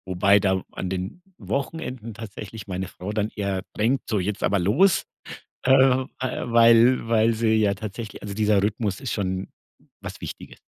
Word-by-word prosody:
wobei 100 Hz, +3 st, +5 dB
da 95 Hz, -1 st, +1 dB
an 95 Hz, -, -4 dB
den 95 Hz, -, -4 dB, 0.2 s
Wochenenden 130 Hz, -5 st, -4 dB
tatsächlich 110 Hz, -1 st, -8 dB
meine 95 Hz, -1 st, -3 dB
Frau 95 Hz, +3 st, -7 dB
dann 105 Hz, 0 st, -1 dB
eher, 100 Hz, -2 st, -2 dB, 0.2 s
denkt, 120 Hz, +5 st, 0 dB
so 110 Hz, -, +1 dB
jetzt 100 Hz, +2 st, -3 dB
aber 100 Hz, -, +2 dB
los, 130 Hz, -, +3 dB, 0.6 s
äh, 130 Hz, -, +3 dB, 0.5 s
weil 115 Hz, -1 st, +4 dB
weil 115 Hz, 0 st, +3 dB
sie 110 Hz, 0 st, +2 dB
ja 105 Hz, -2 st, +2 dB
tatsächlich 110 Hz, +2 st, -7 dB
also, 100 Hz, -1 st, -5 dB
dieser 105 Hz, -1 st, +3 dB
Rhythmus 105 Hz, 0 st, -1 dB
ist 130 Hz, -4 st, -4 dB
schon 95 Hz, -2 st, -2 dB, 0.5 s
was -, -, -8 dB
Wichtiges. -, -, -9 dB
105 Hz, 155 wpm, -24 LUFS, 100-115 Hz, 0.6 s, wobei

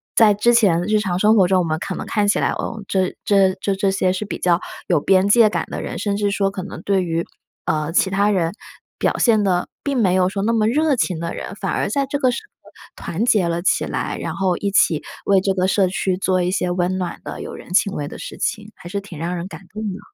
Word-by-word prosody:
在 210 Hz, -3 st, +6 dB
之 235 Hz, +4 st, +3 dB
前 190 Hz, -8 st, +4 dB
日 215 Hz, +3 st, +2 dB
常 185 Hz, -4 st, -1 dB
生 215 Hz, +4 st, +4 dB
活 190 Hz, -4 st, +5 dB
中， 190 Hz, -1 st, +3 dB
我 -, -, +2 dB
们 155 Hz, -1 st, -1 dB
可 -, -, -4 dB
能 -, -, -5 dB
看 210 Hz, -2 st, 0 dB
起 205 Hz, -, +3 dB
来， -, -, +1 dB
呃， 220 Hz, -2 st, -4 dB
这 190 Hz, -1 st, 0 dB
这 195 Hz, -2 st, +3 dB
这 200 Hz, -, 0 dB
这 195 Hz, +1 st, +1 dB
些 185 Hz, -1 st, +1 dB
是 190 Hz, +3 st, -3 dB
比 205 Hz, -, -5 dB
较 175 Hz, -1 st, +2 dB, 0.3 s
有 170 Hz, -5 st, +3 dB
边 190 Hz, +3 st, +3 dB
界 215 Hz, +1 st, +6 dB
感 -, -, -2 dB
的 -, -, -4 dB
人， -, -, -5 dB
甚 205 Hz, -1 st, -1 dB
至 205 Hz, 0 st, 0 dB
说 200 Hz, -1 st, 0 dB
可 190 Hz, -1 st, -5 dB
能 -, -, -8 dB
对 195 Hz, -2 st, +1 dB
于， 165 Hz, -1 st, -2 dB, 0.4 s
呃， 155 Hz, 0 st, -1 dB
其 190 Hz, +2 st, +2 dB
他 200 Hz, +2 st, +2 dB
人 175 Hz, -5 st, +1 dB, 0.5 s
表 -, -, +1 dB
现 220 Hz, -4 st, +3 dB
得 180 Hz, -3 st, +1 dB, 0.2 s
并 280 Hz, -2 st, -1 dB
没 190 Hz, -6 st, +3 dB
有 185 Hz, 0 st, +3 dB
说 195 Hz, 0 st, -3 dB
那 230 Hz, +3 st, +1 dB
么 215 Hz, -2 st, +2 dB
热 295 Hz, +4 st, +2 dB
情 185 Hz, -8 st, -1 dB
的 170 Hz, 0 st, -4 dB
人， 200 Hz, -, -6 dB
反 -, -, -3 dB
而 -, -, -1 dB
在 275 Hz, +6 st, 0 dB
这 285 Hz, +1 st, -3 dB
个 255 Hz, -, +3 dB
时 255 Hz, -, -3 dB
候 -, -, -32 dB, 0.5 s
团 180 Hz, +7 st, -3 dB
结 210 Hz, -8 st, +3 dB
了 170 Hz, 0 st, -1 dB
起 -, -, +1 dB
来， -, -, -3 dB
然 -, -, -4 dB
后 190 Hz, -2 st, +1 dB
一 200 Hz, -, -1 dB
起 160 Hz, -5 st, +3 dB, 0.2 s
为 195 Hz, -1 st, +4 dB
这 195 Hz, 0 st, +1 dB
个 185 Hz, -1 st, 0 dB
社 190 Hz, -1 st, +3 dB
区 190 Hz, -1 st, -1 dB
做 185 Hz, -1 st, +1 dB
一 180 Hz, 0 st, 0 dB
些 180 Hz, -1 st, 0 dB
温 180 Hz, +1 st, 0 dB
暖 180 Hz, -2 st, -4 dB
的、 -, -, -7 dB
有 -, -, -7 dB
人 -, -, -12 dB
情 200 Hz, 0 st, +3 dB
味 145 Hz, -5 st, -3 dB
的 -, -, -9 dB
事 -, -, -8 dB
情， 210 Hz, 0 st, -3 dB
还 175 Hz, -, -12 dB
是 200 Hz, +2 st, -2 dB
挺 195 Hz, -5 st, -11 dB
让 175 Hz, +3 st, -2 dB
人 170 Hz, +2 st, -5 dB
感 195 Hz, -, -10 dB
动 215 Hz, -, -6 dB
的， 200 Hz, -3 st, -4 dB
195 Hz, 285 characters per minute, -20 LUFS, 180-210 Hz, 0.5 s, 在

